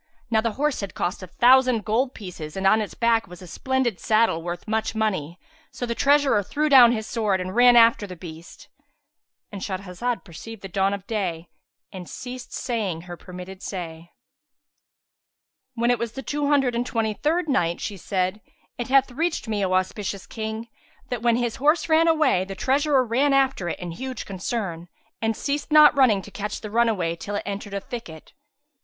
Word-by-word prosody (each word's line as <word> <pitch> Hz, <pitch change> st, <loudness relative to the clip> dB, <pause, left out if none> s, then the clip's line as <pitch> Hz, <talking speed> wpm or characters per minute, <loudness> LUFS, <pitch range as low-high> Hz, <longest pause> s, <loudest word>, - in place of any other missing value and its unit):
Now 220 Hz, -1 st, +3 dB
the 230 Hz, -1 st, -1 dB
horse 295 Hz, +2 st, 0 dB
had 200 Hz, -2 st, -6 dB
cost 175 Hz, +3 st, -2 dB
a 185 Hz, -, -8 dB
thousand 250 Hz, +2 st, +4 dB
gold 250 Hz, +5 st, 0 dB
pieces 175 Hz, -5 st, -8 dB
and 190 Hz, -, -2 dB
on 215 Hz, +3 st, +5 dB
its 210 Hz, -, -5 dB
back 230 Hz, -2 st, +2 dB
was 180 Hz, -1 st, -12 dB
a -, -, -9 dB
splendid 250 Hz, +3 st, -1 dB
saddle 215 Hz, -6 st, +2 dB
worth 175 Hz, +3 st, -6 dB
much 220 Hz, +1 st, -1 dB
money; 185 Hz, -7 st, -2 dB, 0.3 s
so 245 Hz, -, -5 dB
the 235 Hz, -, -2 dB
treasurer 280 Hz, -4 st, +3 dB
threw 300 Hz, +10 st, -1 dB
down 250 Hz, -4 st, +8 dB
his 220 Hz, -2 st, -2 dB
sword, 215 Hz, -5 st, 0 dB
and 185 Hz, +2 st, -5 dB
ran 245 Hz, 0 st, +7 dB
after 230 Hz, -3 st, +5 dB
his 180 Hz, -2 st, -9 dB
beast.—And 205 Hz, -, -14 dB
Shahrazad 195 Hz, +5 st, -3 dB
perceived 200 Hz, +4 st, -10 dB
the 195 Hz, -, -6 dB
dawn 195 Hz, +2 st, +1 dB
of 200 Hz, -1 st, -11 dB
day 180 Hz, -7 st, -3 dB, 0.4 s
and 180 Hz, -2 st, -9 dB
ceased 250 Hz, -1 st, -8 dB
saying 210 Hz, -9 st, -2 dB
her 175 Hz, 0 st, -8 dB
permitted 180 Hz, +2 st, -10 dB
say. 170 Hz, -3 st, -6 dB, 1.7 s
When 235 Hz, +1 st, +2 dB
it 245 Hz, -, +1 dB
was 235 Hz, -1 st, -3 dB
the 270 Hz, -, -7 dB
Two 290 Hz, +1 st, -2 dB
Hundred 275 Hz, -4 st, +3 dB
and 235 Hz, +1 st, 0 dB
Twenty 225 Hz, -3 st, -1 dB
third 320 Hz, -, 0 dB
Night, 175 Hz, -, +1 dB
She 205 Hz, -, -4 dB
said, 185 Hz, +2 st, -2 dB, 0.4 s
It 240 Hz, -, -3 dB
hath 270 Hz, 0 st, +3 dB
reached 320 Hz, +1 st, -2 dB
me, 210 Hz, -2 st, -1 dB
O 185 Hz, -1 st, 0 dB
auspicious 190 Hz, +1 st, -2 dB
King, 220 Hz, 0 st, -5 dB, 0.4 s
that 245 Hz, -3 st, -3 dB
when 235 Hz, -1 st, +3 dB
his 240 Hz, -1 st, -1 dB
horse 305 Hz, +4 st, +2 dB
ran 325 Hz, +1 st, +4 dB
away, 310 Hz, -, +3 dB
the 195 Hz, +1 st, -7 dB
treasurer 270 Hz, +3 st, +2 dB
ran 265 Hz, +5 st, +2 dB
after 265 Hz, -10 st, +2 dB
it -, -, -3 dB
in 175 Hz, -1 st, -6 dB
huge 260 Hz, +8 st, -6 dB
concern, 185 Hz, -3 st, -4 dB, 0.3 s
and 225 Hz, -1 st, 0 dB
ceased 290 Hz, +2 st, -3 dB
not 300 Hz, -1 st, +8 dB
running 230 Hz, -8 st, +4 dB
to 205 Hz, -, -12 dB
catch 210 Hz, +1 st, -5 dB
the 215 Hz, -, -7 dB
runaway 215 Hz, -8 st, +1 dB
till 205 Hz, +4 st, -6 dB
it -, -, -2 dB
entered 200 Hz, 0 st, -5 dB
a -, -, -1 dB
thicket. 195 Hz, -8 st, -9 dB
220 Hz, 185 wpm, -24 LUFS, 185-255 Hz, 1.7 s, down